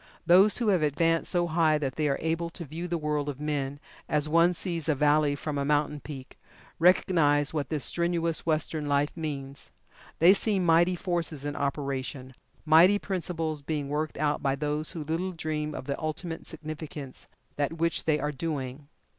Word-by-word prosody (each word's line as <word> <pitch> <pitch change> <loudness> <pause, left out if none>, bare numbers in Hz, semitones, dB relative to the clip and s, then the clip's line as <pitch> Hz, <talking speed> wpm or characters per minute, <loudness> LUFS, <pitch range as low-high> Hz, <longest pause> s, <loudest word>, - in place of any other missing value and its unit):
Those 190 +4 +6
who 235 -3 +1
have 185 -5 +3
advanced 165 +3 +1
so 175 -1 +2
high 160 -2 +2
that 135 -3 -3
they 155 -1 0
are 140 - +1
able 165 +1 -1
to 170 0 -8
view 165 +5 -6
the 175 -1 -1
world 150 -2 -1
of 140 -1 -6
men, 145 -2 -2 0.3
as 150 0 +1
one 170 +3 +4
sees 165 -3 -3
a 155 - +3
valley 150 0 +3
from 145 0 -4
a - - 0
mountain 150 +1 +1
peak, 135 -3 -10 0.4
recognize 160 -4 +3
what 150 -3 -2
this 155 -3 -1
strenuous 170 -1 0
Western 155 -1 0
life 145 +1 +1
means. 140 -4 -5 0.5
They 175 +4 +7
see 205 0 +1
mighty 175 0 +3
forces 165 -5 -2
in 145 0 -3
operation 135 -2 -3 0.3
mighty 165 +6 +6
principles 165 -6 -3
being 145 -1 -3
worked 150 +1 -2
out 150 0 0
by 135 -1 +1
those 150 +3 -2
who 165 -4 -5
little 165 +5 -2
dream 155 -2 -3
of - - -6
the 140 +3 -4
ultimate 160 +1 -4
significance 155 -3 -7
of - - -31 0.3
that 145 +2 0
which 165 +1 0
they 155 -2 +2
are 150 +1 -1
doing. 140 -2 -4
155 Hz, 180 wpm, -28 LUFS, 145-165 Hz, 0.5 s, They